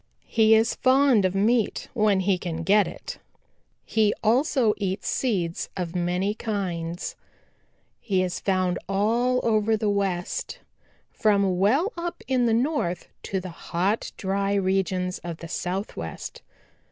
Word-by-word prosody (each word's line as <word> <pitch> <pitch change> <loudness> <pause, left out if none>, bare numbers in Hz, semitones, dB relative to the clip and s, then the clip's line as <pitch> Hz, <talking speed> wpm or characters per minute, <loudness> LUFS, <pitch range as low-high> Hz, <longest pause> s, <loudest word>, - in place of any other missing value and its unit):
He 220 -1 +4
is 225 +2 +3
fond 260 -5 +4
of 185 +1 0
meat 220 +3 +1
when 210 -5 +3
he 190 -1 +1
can 165 -2 -4
get 205 +3 +4
it. - - -8 0.7
He 215 -2 +2
also 240 0 +3
eats 195 -1 -3
seeds 180 -10 -1
of 175 -1 -4
many 180 +3 0
kinds. 180 -6 -3 0.8
He 190 -4 0
is 180 -1 -3
found 185 -2 0
all 235 +6 +2
over 220 -1 +2
the 210 -1 0
West 195 -3 -2 0.5
from 200 -4 +2
well 275 - +2
up 345 0 -5
in 255 -2 +2
the - - +2
North 235 - -1 0.2
to 195 - 0
the 185 0 -7
hot 180 +5 -2
dry 195 +1 0
regions 185 -1 0
of 170 -2 -6
the 170 - -8
Southwest. 180 - -5
200 Hz, 135 wpm, -25 LUFS, 180-225 Hz, 0.8 s, He